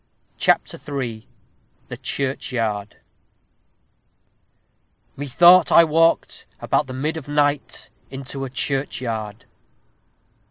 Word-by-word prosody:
_ - - -41
CHAPTER - - +1
III 125 -6 -5 0.6
THE - - -7
CHURCHYARD 115 -6 -3 2.2
Methought 170 +6 +5
I 170 - +8
walked, 165 +1 +1
about 145 - 0
the 130 - -7
mid 150 +5 -2
of 145 - -8
night, 145 -1 -1 0.2
Into 135 0 -6
a 135 - -4
churchyard. 120 -6 -3
135 Hz, 90 wpm, -21 LUFS, 120-150 Hz, 2.2 s, I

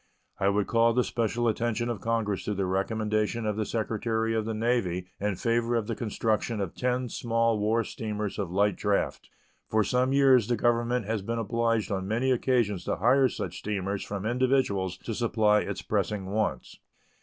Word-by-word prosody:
I 95 - +3
would 100 0 +1
call 115 0 +3
the 125 +1 +3
special 120 +1 -1
attention 120 +1 0
of 115 -5 -3
Congress 110 -2 -1
to 105 - -1
the 95 0 0
recommendation 110 +3 -1
of 105 -1 0
the 110 0 -2
Secretary 115 0 -1
of 110 -1 0
the 110 - -2
Navy 110 -6 0
in 105 0 -1
favor 115 +4 0
of 115 -2 0
the - - -3
construction 110 0 -1
of 95 -4 -3
ten 125 0 -1
small 115 -1 0
war 110 +2 +2
steamers 105 -3 -4
of 100 -4 -2
light 100 +3 +2
draft. 105 -1 -1 0.4
For 110 0 +3
some 125 +4 +1
years 135 -5 +5
the 120 - +1
Government 120 -1 +1
has 110 0 -1
been 115 +4 -3
obliged 115 0 0
on 95 -1 -2
many 120 +5 +1
occasions 120 -6 +1
to - - 0
hire 130 +5 +4
such - - -5
steamers 100 -1 -3
from 100 0 -5
individuals 120 -7 +1
to 115 - -5
supply 110 -2 +2
its - - -4
pressing 105 -3 -1
wants. 105 - -2
110 Hz, 180 wpm, -28 LUFS, 105-120 Hz, 0.4 s, years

